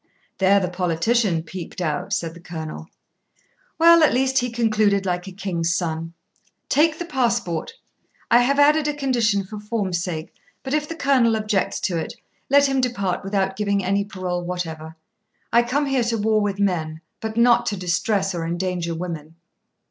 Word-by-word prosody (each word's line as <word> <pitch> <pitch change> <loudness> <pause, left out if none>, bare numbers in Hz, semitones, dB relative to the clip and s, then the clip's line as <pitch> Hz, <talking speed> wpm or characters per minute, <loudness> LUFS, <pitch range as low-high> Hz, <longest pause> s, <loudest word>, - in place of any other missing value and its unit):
"' - - -40
'There 195 +1 +5
the 185 - -1
politician 180 +1 0
peeped 170 +2 -8
out,' 155 -4 -2
said 165 -1 -1
the 170 - -13
Colonel. 160 -2 -7 0.9
'Well, 335 0 +7
at 305 - +4
least 265 +1 +2
he 245 - -1
concluded 215 -4 +1
like 180 0 -2
a - - -6
king's 175 -3 -2
son: 165 -1 -3 0.5
"Take 310 +3 +3
the 345 - -4
passport; 235 - -1 0.6
I 235 - +7
have 275 +3 +2
added 300 +1 +4
a 295 - -1
condition 235 -8 +1
for 210 +2 -8
form's 205 -5 -2
sake; 160 -3 -5 0.3
but 265 - -4
if 300 0 0
the 330 - -4
Colonel 260 -7 +3
objects 210 -3 -1
to 170 -3 -1
it, - - -5 0.3
let 280 +1 +6
him 270 -1 +1
depart 200 -8 -1
without 195 -1 -1
giving 200 -1 0
any 200 +2 +1
parole 185 -3 -4
whatever. 160 -3 -5 0.6
I 235 - +6
come 270 +5 0
here 270 -3 +1
to 230 -1 0
war 215 0 +2
with 200 -1 -2
men, 160 -5 -1 0.2
but 220 0 -5
not 240 0 +4
to 205 - -1
distress 190 +2 0
or 170 -2 -3
endanger 170 0 -2
women."' 165 -2 -6
200 Hz, 175 wpm, -22 LUFS, 175-240 Hz, 0.9 s, Well